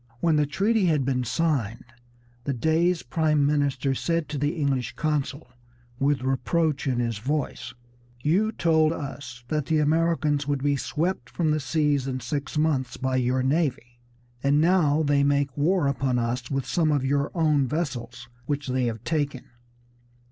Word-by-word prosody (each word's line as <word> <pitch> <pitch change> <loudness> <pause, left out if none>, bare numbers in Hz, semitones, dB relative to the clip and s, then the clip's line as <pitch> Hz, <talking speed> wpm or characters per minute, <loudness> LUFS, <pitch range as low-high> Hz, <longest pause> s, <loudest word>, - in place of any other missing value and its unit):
When 165 +1 +2
the 150 -1 +2
treaty 205 +6 +1
had 150 -6 +2
been 130 -2 0
signed 125 -6 -1 0.6
the 140 - -1
Dey's 165 +7 +1
prime 150 +2 +1
minister 140 -2 +1
said 165 +3 -1
to 145 -2 -3
the 145 +4 0
English 135 -6 -1
consul, 145 -3 -2 0.5
with 140 -2 +1
reproach 140 +3 0
in 130 -2 +1
his 115 -3 -1
voice, 145 +5 -3 0.5
"You 195 +9 +2
told 160 -5 +2
us 135 -5 -7
that 150 -3 -1
the 160 - +2
Americans 150 -2 +1
would 140 -2 -1
be 145 0 +2
swept 155 -1 -2
from 160 -3 0
the 155 - +1
seas 145 -2 0
in 130 -1 -2
six 140 +5 -4
months 150 -5 0
by 130 0 -1
your 130 +1 +1
navy, 130 -5 -1 0.4
and 140 +1 +3
now 160 -3 +3
they 140 -1 +2
make 140 -2 +1
war 165 +3 +2
upon 135 -2 0
us 120 +1 -2
with 135 -2 -1
some 160 -3 +1
of 140 -3 +1
your 140 +1 +1
own 150 -5 +2
vessels 125 -6 -4 0.2
which 145 -2 -2
they 130 0 +1
have 115 -2 -3
taken." 145 -5 -1
145 Hz, 160 wpm, -25 LUFS, 130-155 Hz, 0.6 s, and